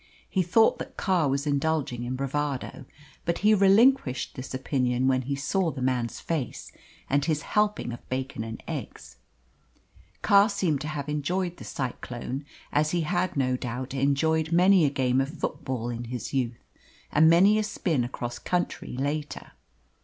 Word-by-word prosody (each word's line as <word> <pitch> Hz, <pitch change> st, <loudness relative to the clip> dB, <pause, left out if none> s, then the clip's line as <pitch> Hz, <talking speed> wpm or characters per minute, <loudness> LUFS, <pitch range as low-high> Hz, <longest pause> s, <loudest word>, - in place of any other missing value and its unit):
He 190 Hz, -, +1 dB
thought 205 Hz, +6 st, +3 dB
that -, -, -8 dB
Carr 180 Hz, -7 st, +2 dB
was 140 Hz, +2 st, -1 dB
indulging 140 Hz, -4 st, 0 dB
in 125 Hz, +1 st, -3 dB
bravado, 140 Hz, 0 st, -3 dB, 0.4 s
but 170 Hz, -, 0 dB
he 215 Hz, -, +7 dB
relinquished 200 Hz, -, +4 dB
this 130 Hz, -, -7 dB
opinion 130 Hz, -1 st, 0 dB
when 130 Hz, -1 st, +3 dB
he 140 Hz, +2 st, -3 dB
saw 170 Hz, +6 st, 0 dB
the 150 Hz, -, -6 dB
man's 125 Hz, -3 st, -1 dB
face 155 Hz, -7 st, -4 dB, 0.4 s
and 140 Hz, +1 st, +2 dB
his 150 Hz, -1 st, 0 dB
helping 210 Hz, -11 st, 0 dB
of 120 Hz, -, -11 dB
bacon 130 Hz, -2 st, -3 dB
and 115 Hz, 0 st, -7 dB
eggs. 65 Hz, -1 st, -7 dB, 1.1 s
Carr 200 Hz, +2 st, +6 dB
seemed 180 Hz, -8 st, 0 dB
to 150 Hz, -, -4 dB
have 150 Hz, -2 st, -4 dB
enjoyed 175 Hz, +5 st, -1 dB
the -, -, -10 dB
cyclone, 130 Hz, +1 st, -5 dB, 0.3 s
as 150 Hz, +1 st, +2 dB
he 175 Hz, +1 st, 0 dB
had 175 Hz, +1 st, -1 dB
no 130 Hz, -2 st, +2 dB
doubt 125 Hz, +1 st, -5 dB
enjoyed 155 Hz, +4 st, +1 dB
many 180 Hz, 0 st, +5 dB
a -, -, +3 dB
game 130 Hz, -2 st, +1 dB
of 145 Hz, +5 st, -4 dB
football 120 Hz, -4 st, -3 dB
in 120 Hz, 0 st, -4 dB
his 120 Hz, +1 st, -5 dB
youth, 120 Hz, -3 st, -2 dB, 0.5 s
and 160 Hz, +2 st, +6 dB
many 195 Hz, +6 st, +6 dB
a -, -, +1 dB
spin 170 Hz, -, -1 dB
across 120 Hz, -1 st, -5 dB
country 175 Hz, -7 st, -2 dB
later. 145 Hz, +2 st, -3 dB
140 Hz, 160 wpm, -27 LUFS, 130-170 Hz, 1.1 s, he